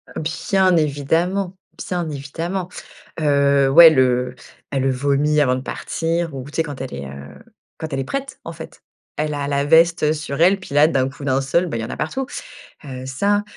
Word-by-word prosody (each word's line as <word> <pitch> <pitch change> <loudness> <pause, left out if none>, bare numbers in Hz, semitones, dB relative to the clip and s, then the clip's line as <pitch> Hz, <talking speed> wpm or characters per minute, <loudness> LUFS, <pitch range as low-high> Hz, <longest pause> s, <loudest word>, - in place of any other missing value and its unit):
Bien 180 +3 +1
évidemment, 165 +6 0 0.3
bien 175 -2 -2
évidemment. 165 +6 -4 0.5
Heu, 140 -2 +3
ouais 165 +2 +10
le 125 -3 +1 0.3
elle 135 -1 0
vomi 140 +3 +1
avant 130 -3 +2
de 130 - -4
partir 165 +2 -3
ou 130 - -5
tu 145 - -9
sais? 165 - +2
Quand 145 -4 -7
elle 130 0 -6
est, 70 0 -6
heu, 70 +1 -10 0.4
quand 160 - -5
elle 135 - -2
est - - -1
prête 275 - -5
en - - -7
fait. - - -11 0.4
Elle 150 0 -1
a 140 -1 -3
la 140 0 0
veste 165 0 +4
sur 150 -2 -5
elle, 190 +3 +5
puis 165 -6 -8
là 150 +1 +6
d'un 135 -4 +1
coup 140 +1 -12
d'un 135 -1 +1
seul, 155 +7 +1
bah, 155 - -3
il - - -3
y 110 - -3
en - - -9
a - - -6
partout. 255 - -3 0.6
Heu, 130 -1 -7
ça 200 +10 +1
150 Hz, 200 wpm, -20 LUFS, 135-170 Hz, 0.6 s, ouais